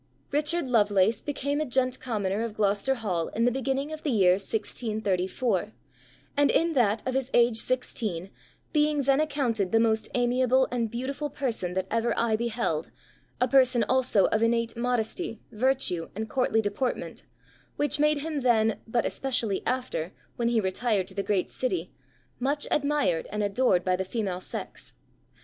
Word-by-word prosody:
_] - - -29
"Richard 300 +1 +1
Lovelace... 210 -3 +3
became 285 0 -2
a - - 0
gent 255 0 +1
commoner 210 -5 -2
of 230 -2 -4
Glo'cester 210 +5 +1
Hall 185 -8 -2
in 230 +2 +2
the 245 - +3
beginning 270 +3 -2
of 310 - -7
the 305 - -2
year 195 -8 +4
1634, 205 0 -1 0.6
and 285 0 +4
in 330 0 +2
that 220 -4 +1
of 260 - 0
his 265 -1 -1
age 235 -1 +4
16, 215 -7 -1 0.4
being 300 -1 +2
then 275 +2 +3
accounted 250 -10 0
the 225 - +4
most 220 -1 +1
amiable 250 +1 +3
and 235 -2 -1
beautiful 270 +6 -3
person 225 -11 -3
that 190 0 0
ever 230 +1 0
eye 230 -2 +2
beheld, 225 -8 -2 0.5
a 250 - +3
person 255 -3 +4
also 255 -6 +2
of 220 - +1
innate 230 0 +1
modesty, 235 - -2
virtue, 225 -8 0
and 220 +2 -3
courtly 250 -4 +2
deportment, 205 +5 -3 0.5
which 290 0 0
made 300 -1 +3
him 310 -1 -2
then, 225 -4 +2
but 235 +1 0
especially 235 -7 -1
after, 250 -9 -2 0.2
when 235 - 0
he 235 -1 +2
retired 200 0 0
to 190 - -10
the 200 - -1
great 195 -2 -1
city, 260 +8 -2 0.5
much 285 +3 0
admired 285 - +1
and 210 +1 -1
adored 200 -3 +2
by 185 -1 +2
the 190 - -2
female 190 -2 -3
sex.... - - -8
235 Hz, 165 wpm, -27 LUFS, 205-265 Hz, 0.6 s, year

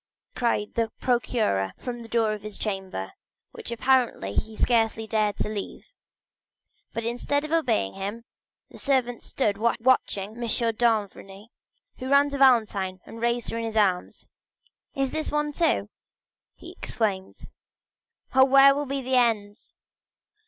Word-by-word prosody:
cried 230 -4 0
the 230 -1 0
procureur 220 - 0
from 240 -1 -6
the 230 - -10
door 225 -2 +1
of 210 - -6
his 215 -1 -7
chamber, 190 - -4 0.4
which - - -8
apparently 240 - +1
he 220 - -2
scarcely 225 -2 +1
dared 215 -2 0
to - - -1
leave. 210 - -6 1.0
But 230 - -4
instead 245 +5 -1
of 305 - -7
obeying 100 - +1
him, 205 +4 -5 0.5
the - - -11
servants 255 -4 0
stood 205 -6 0
watching 230 -3 +1
M. 235 +2 -11 0.3
d'Avrigny, 215 -2 -1 0.5
who 255 - -5
ran 280 +1 +5
to 280 - -3
Valentine, 215 -8 +3
and 230 - -10
raised 235 0 0
her 230 - -3
in - - -3
his 225 -1 -3
arms. 190 -4 0 0.7
"What?—this 275 +2 -2
one, 295 0 -1
too?" 330 +1 +1 0.7
he - - -11
exclaimed. 195 -4 -3 1.0
"Oh, 265 0 +7
where 275 +1 +7
will 290 +1 -3
be 275 0 -3
the 260 0 +1
end?" 215 -4 +2
230 Hz, 140 wpm, -26 LUFS, 210-260 Hz, 1.0 s, Oh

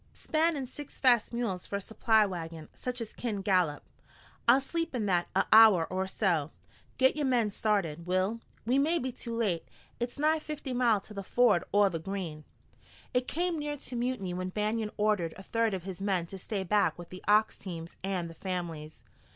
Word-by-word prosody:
"Span 320 0 +1
in 270 - -3
six 280 +3 -10
fast 245 -4 +4
mules 230 -7 -2
for - - -4
a - - 0
supply 220 +1 +3
wagon, 165 -4 -6
such 250 -1 -4
as 225 - -6
kin 210 -5 -3
gallop. 180 -7 +2 0.6
I'll 245 +3 +7
sleep 330 +2 -3
in 225 -4 -1
that 175 -3 +1
a - - +3
hour 215 -7 +8
or 190 +1 -1
so. 175 -7 0 0.5
Git 260 +1 +4
yore 300 - -1
men 235 -5 +2
started, 180 -7 -1
Will. 185 +5 +1 0.3
We 255 +4 +3
may 320 +5 +2
be 260 -4 -2
too 235 -1 -6
late. 200 -8 0 0.3
It's 240 0 -3
nigh 310 +2 +3
fifty 300 -3 -5
mile 235 -5 +3
to 210 - -12
the 200 - -4
ford 195 -3 +3
o' 205 0 +5
the 170 -4 -2
Green." 165 -4 -5 0.7
It 250 0 +1
came 345 0 -1
near 295 0 -3
to 260 -2 -7
mutiny 240 -7 -2
when 185 +1 -3
Banion 215 +2 -1
ordered 205 -6 +1
a 190 - -10
third 230 -1 0
of 185 - -6
his 190 0 -7
men 190 -4 0
to 190 +3 -8
stay 195 +1 -3
back 205 +3 +2
with 175 -1 -10
the 185 - -10
ox 215 +1 +4
teams 170 -3 -8
and 190 -3 -1
the 165 - -9
families. 165 -4 -5
210 Hz, 200 wpm, -30 LUFS, 180-245 Hz, 0.7 s, hour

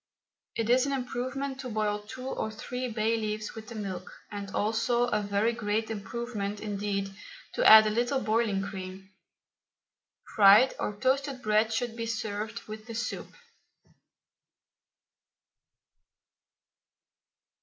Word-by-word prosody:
It 225 - -1
is 255 +2 +4
an 280 - -1
improvement 265 +1 -3
to 255 - -5
boil 210 -2 0
two 255 +5 -9
or 220 - -2
three 250 +4 -4
bay 225 0 +1
leaves 215 -1 -3
with 220 -1 -9
the 235 - -8
milk, 190 -4 -5 0.2
and 200 -1 -5
also 225 +4 +1
a 210 -4 +1
very 205 +3 +1
great 220 -1 -1
improvement 210 -1 -4
indeed 200 -2 -2 0.4
to - - 0
add 220 0 +11
a 215 - +1
little 245 +5 +1
boiling 215 -3 +1
cream. 190 -1 -7 1.2
Fried 205 +5 +7
or 210 - -2
toasted 265 +3 0
bread 215 +1 +3
should 230 0 -1
be 230 -1 -3
served 220 0 -3
with 215 +1 -9
the 230 - -6
soup. 235 - -4
220 Hz, 125 wpm, -29 LUFS, 205-240 Hz, 1.2 s, add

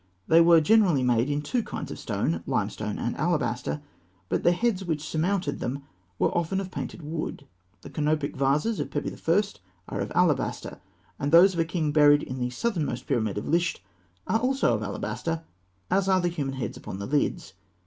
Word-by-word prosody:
They 165 +1 +6
were 165 -1 +7
generally 180 -6 +4
made 120 +1 +2
in 145 0 -1
two 245 - 0
kinds - - -6
of - - -7
stone, 85 0 -1
limestone 105 -1 -2
and 120 - -2
alabaster; 150 -3 -1 0.5
but - - 0
the 175 - +4
heads 195 +1 0
which 155 -4 -3
surmounted 180 +4 -1
them 135 +3 -3 0.3
were - - +1
often 175 +3 0
of 190 -1 -5
painted 170 - -6
wood. 155 -1 -5 0.4
The - - -11
canopic 150 -1 0
vases 145 +11 +1
of - - -2
Pepi - - -3
I. 170 +5 +2 0.5
are - - -4
of - - -4
alabaster; - - +1 0.4
and 140 +1 -1
those 180 +4 +7
of 170 - -3
a 165 - +3
king 160 -3 -1
buried 145 -1 +5
in 130 0 -5
the 125 0 -1
southernmost 165 - -2
pyramid 110 -8 0
at 105 - -3
Lisht 170 +2 0 0.4
are 220 - +1
also 265 +3 +2
of - - -1
alabaster, 165 -1 -3 0.5
as 195 0 +2
are 190 -1 +4
the 175 -1 +1
human 140 -5 -3
heads 120 -5 -4
upon - - -7
the 100 - -5
lids. 135 -8 -1
155 Hz, 190 wpm, -26 LUFS, 135-175 Hz, 0.5 s, were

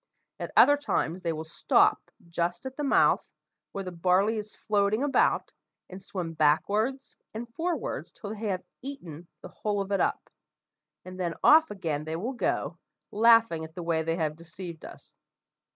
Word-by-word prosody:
At - - -5
other 290 0 +7
times 190 - -1
they 170 -2 -1
will 160 0 -4
stop 160 - +2 0.2
just 170 +5 -2
at 260 0 -6
the 295 - -4
mouth, 280 - +4 0.5
where 195 - -4
the 185 - -6
barley 185 +5 +2
is 210 0 -6
floating 210 +3 +1
about, 290 -1 +2 0.4
and 185 +1 -8
swim 180 -3 -5
backwards 205 - +1 0.2
and 235 +2 -5
forwards 340 +4 -3
till 205 - -8
they 220 0 -5
have 185 -2 -2 0.2
eaten 175 - -8 0.2
the - - -8
whole 210 -1 -2
of 195 0 -3
it 200 - +2
up, - - -1 0.7
and 185 0 -9
then 175 -2 -2
off 320 +1 +7
again 160 -7 -3
they 160 +1 -4
will 225 +11 -3
go, 245 - -2 0.3
laughing 230 -6 +4
at 160 0 -10
the 175 - -5
way 165 -1 +1
they 165 +1 -1
have 155 -2 -2
deceived 170 0 -9
us. - - -13
190 Hz, 170 wpm, -28 LUFS, 165-225 Hz, 0.7 s, other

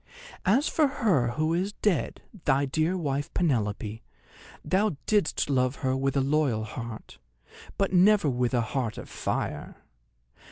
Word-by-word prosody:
As 250 +10 +4
for 310 -2 +3
her 205 - +1
who 155 +3 0
is 190 +4 -1
dead, 205 -8 -1 0.2
thy 140 0 +3
dear 160 +6 0
wife 145 -4 -2
Penelope, 110 - -1 0.6
thou 195 -4 +1
didst 205 -6 +1
love 130 -2 +1
her 130 0 +2
with 135 +1 0
a - - +3
loyal 135 -5 +1
heart, 110 - -8 0.6
but 195 -1 0
never 195 0 +5
with 125 -1 0
a 120 - +3
heart 115 -1 -2
of - - -7
fire. - - -3
145 Hz, 145 wpm, -27 LUFS, 125-185 Hz, 0.6 s, never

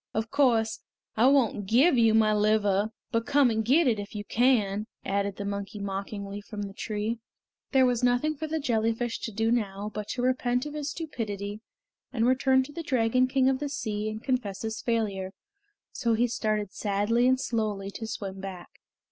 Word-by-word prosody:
"Of 220 +1 -2
course, 235 -6 +2 0.4
I 230 +4 +5
won't 245 -7 +2
give 265 - +5
you 225 -2 +4
my 215 -1 +4
liver, 210 -1 +2 0.2
but 230 -1 0
come 280 -3 +4
and 220 0 0
get 285 +9 +4
it 230 -5 +2
if 205 +2 -7
you 205 0 -4
can!" 215 -4 +2 0.2
added 200 0 -1
the 200 - -5
monkey 200 +1 -4
mockingly 200 0 -5
from 205 0 -6
the 195 -1 -6
tree. 215 +2 -3 0.5
There 265 -2 +5
was 245 -1 +1
nothing 245 +6 +2
for 315 +2 -4
the 320 +1 -1
jellyfish 230 -2 0
to 225 - -5
do 225 +2 0
now 210 -3 -1
but 210 -1 -5
to 245 - -3
repent 250 0 +1
of 295 - -6
his 300 -1 -3
stupidity, 210 - -5 0.5
and 230 -3 +1
return 260 +1 +3
to 280 - -10
the 335 - -4
Dragon 255 -3 +2
King 260 0 +2
of 265 -1 +2
the 290 -1 -3
Sea 215 -7 -3
and 215 +1 -6
confess 245 -8 -2
his 220 0 -3
failure, 200 -5 -1 0.6
so 230 -4 0
he 240 +2 +2
started 215 -3 -1
sadly 210 +4 +1
and 260 0 +3
slowly 215 -6 -2
to 225 +2 -6
swim 195 -3 -5
back. 185 -2 -9
225 Hz, 190 wpm, -28 LUFS, 205-255 Hz, 0.6 s, I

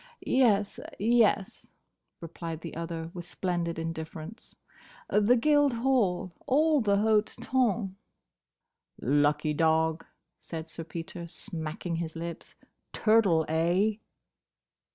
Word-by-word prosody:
"Yes—yes," 215 -2 +1 0.5
replied 165 -1 -6
the 165 - -7
other, 165 0 -5
with 175 - -6
splendid 175 -1 -2
indifference. 165 +5 -7 0.6
"The 210 +4 +4
Guildhall. 250 - +2 0.2
All 300 +2 +3
the 200 -2 +2
hote 215 0 +2
tonn." 225 -6 0 1.0
"Lucky 145 +3 +2
dog," 160 +1 +2 0.4
said 160 -1 -7
Sir 165 +1 -7
Peter, 170 +1 -7
smacking 165 -1 -5
his 165 -1 -4
lips: 170 0 -7 0.4
"turtle, 205 -8 +3
eh?" 175 +7 +2
175 Hz, 90 wpm, -29 LUFS, 165-220 Hz, 1.0 s, The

